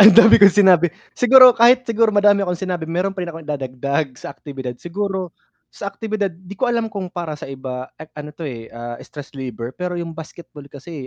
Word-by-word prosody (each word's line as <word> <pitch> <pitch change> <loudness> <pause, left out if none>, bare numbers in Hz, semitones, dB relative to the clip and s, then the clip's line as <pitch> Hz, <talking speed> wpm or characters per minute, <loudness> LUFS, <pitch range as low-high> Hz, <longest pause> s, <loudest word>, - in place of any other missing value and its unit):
Ang 210 +1 +9
dami 225 -2 +8
kong 200 -2 +8
sinabi, 180 -3 +5 0.3
siguro 255 0 +7
kahit 240 +2 +4
siguro 230 -1 +1
madami 205 0 +4
akong 180 -2 -2
sinabi 175 -3 -4
meron 180 +4 -1
pa 190 -1 -6
rin 175 - -5
akong 165 -2 -11
dadagdag 140 +1 -2
sa 140 - -9
aktibidad 135 -3 -7
siguro, 190 0 -4 0.4
sa 200 - -6
aktibidad 210 -4 -3
'di 180 +3 -13
ko 250 +5 0
alam 235 -2 -1
kung 195 -3 -5
para 170 -4 -5
sa - - -9
iba 130 -1 -7
an - - -7
an 150 0 -7
ano - - -9
to 165 - -7
eh, 115 -5 -7
ah, 120 0 -7
stress 145 -3 -11
reliever 125 -2 -6
pero 180 +2 -5
yung 165 -1 -6
basketball 160 -2 -11
kasi, 145 -1 -10
175 Hz, 210 wpm, -19 LUFS, 140-200 Hz, 0.4 s, Ang